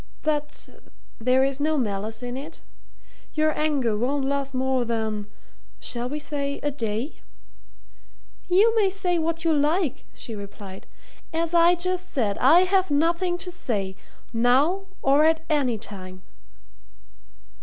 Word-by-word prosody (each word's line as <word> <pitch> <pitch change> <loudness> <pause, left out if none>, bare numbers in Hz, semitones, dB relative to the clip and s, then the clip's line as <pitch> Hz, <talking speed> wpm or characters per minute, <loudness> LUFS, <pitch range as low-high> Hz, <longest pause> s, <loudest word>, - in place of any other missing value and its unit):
"But 300 -1 -2 0.5
there 255 +3 +3
is 270 0 0
no 310 +1 +1
malice 220 -1 -2
in 245 0 -4
it? 295 +5 -8 0.7
Your 310 0 +2
anger 285 -8 +1
won't 265 +5 0
last 275 0 -1
more 260 -1 +1
than 220 -3 -2 0.5
shall 240 0 -1
we 295 - -3
say 285 -1 -3
a 290 - 0
day?" 230 +1 -3 1.3
"You 410 +6 +4
may 415 -3 +4
say 370 -3 0
what 330 +1 -2
you 325 - +4
like," 300 +1 +1
she 230 - -7
replied. 200 -2 -9 0.4
"As 330 0 -1
I 340 +1 +6
just 365 +1 -1
said, 210 -7 0
I 315 +8 +7
have 375 0 +2
nothing 340 +4 +1
to 360 - -5
say 205 - -2 0.4
now 275 +12 +3 0.2
or 280 +2 +5
at 320 0 +3
any 265 -6 +2
time." 185 -3 -9
285 Hz, 135 wpm, -25 LUFS, 235-330 Hz, 1.3 s, I